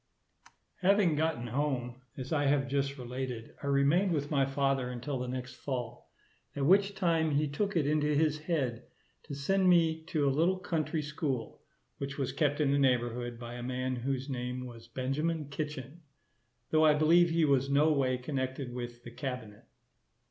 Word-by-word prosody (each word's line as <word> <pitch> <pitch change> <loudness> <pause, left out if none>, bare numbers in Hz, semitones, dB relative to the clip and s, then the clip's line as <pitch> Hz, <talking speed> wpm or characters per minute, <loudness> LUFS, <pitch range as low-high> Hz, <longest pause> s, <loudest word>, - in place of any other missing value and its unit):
Having 190 -3 +3
gotten 155 -5 0
home, 125 -1 -2 0.2
as 130 +3 -4
I 145 -1 +2
have 140 -1 +2
just 140 0 -1
related, 125 -2 -5
I 140 - -4
remained 145 +7 +3
with 145 -1 -2
my 135 -3 +2
father 135 -2 0
until 125 +2 -4
the 125 - -3
next 125 0 -5
fall, 120 -3 -5 0.5
at 140 - 0
which 195 +4 +4
time 165 -4 +2
he 150 +1 +2
took 195 +8 -2
it 160 -4 +2
into 150 0 +2
his 155 0 +2
head 135 -7 -2 0.4
to 145 - -6
send 185 +7 +2
me 165 -2 +4
to 155 -5 0
a 135 - +3
little 170 +6 +2
country 160 -4 -2
school, 145 -5 -3 0.4
which 140 0 -4
was 135 -3 -1
kept 145 -2 0
in 145 -2 +3
the 140 - +3
neighbourhood 120 -2 +1
by 120 0 -8
a 120 - -6
man 130 +1 -2
whose 130 +2 -2
name 125 -1 -4
was 115 -2 -11
Benjamin 145 +5 -2
Kitchen; 150 +1 -5 0.7
though 155 0 +4
I 155 -1 +6
believe 165 +3 +5
he 165 -1 +3
was 135 -2 +2
no 145 +3 +4
way 130 -3 +1
connected 130 -1 -3
with 120 -1 -6
the 120 - -9
cabinet. 125 -6 -6
140 Hz, 175 wpm, -31 LUFS, 125-155 Hz, 0.7 s, I